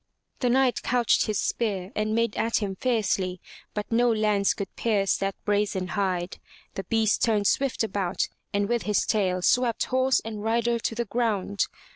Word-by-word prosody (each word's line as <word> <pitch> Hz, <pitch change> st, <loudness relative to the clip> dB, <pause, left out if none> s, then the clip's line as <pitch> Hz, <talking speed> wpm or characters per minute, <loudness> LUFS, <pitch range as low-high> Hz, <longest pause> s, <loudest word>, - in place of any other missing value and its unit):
The 250 Hz, -, +1 dB
Knight 255 Hz, 0 st, +2 dB
couched 245 Hz, -2 st, +2 dB
his 215 Hz, -2 st, 0 dB
spear 200 Hz, -5 st, -2 dB
and 215 Hz, +1 st, 0 dB
made 230 Hz, -2 st, +1 dB
at 230 Hz, +1 st, +1 dB
him 200 Hz, -3 st, -2 dB
fiercely, 195 Hz, -6 st, 0 dB, 0.4 s
but 210 Hz, +1 st, -4 dB
no 240 Hz, +1 st, +3 dB
lance 210 Hz, -2 st, +2 dB
could 200 Hz, -, -6 dB
pierce 205 Hz, -4 st, +1 dB
that 195 Hz, 0 st, -2 dB
brazen 205 Hz, -3 st, 0 dB
hide. 185 Hz, -3 st, -2 dB, 0.3 s
The 195 Hz, -, -5 dB
beast 220 Hz, +1 st, +1 dB
turned 215 Hz, -3 st, +2 dB
swift 265 Hz, +3 st, +1 dB
about 200 Hz, -4 st, -1 dB, 0.2 s
and 200 Hz, 0 st, 0 dB
with 235 Hz, +1 st, 0 dB
his 210 Hz, -2 st, +1 dB
tail 185 Hz, -5 st, 0 dB
swept 245 Hz, 0 st, +2 dB
horse 260 Hz, 0 st, +3 dB
and 215 Hz, -2 st, -5 dB
rider 235 Hz, +1 st, +1 dB
to 225 Hz, -, -2 dB
the 235 Hz, +1 st, -1 dB
ground. 205 Hz, -3 st, 0 dB
215 Hz, 170 wpm, -26 LUFS, 195-235 Hz, 0.4 s, no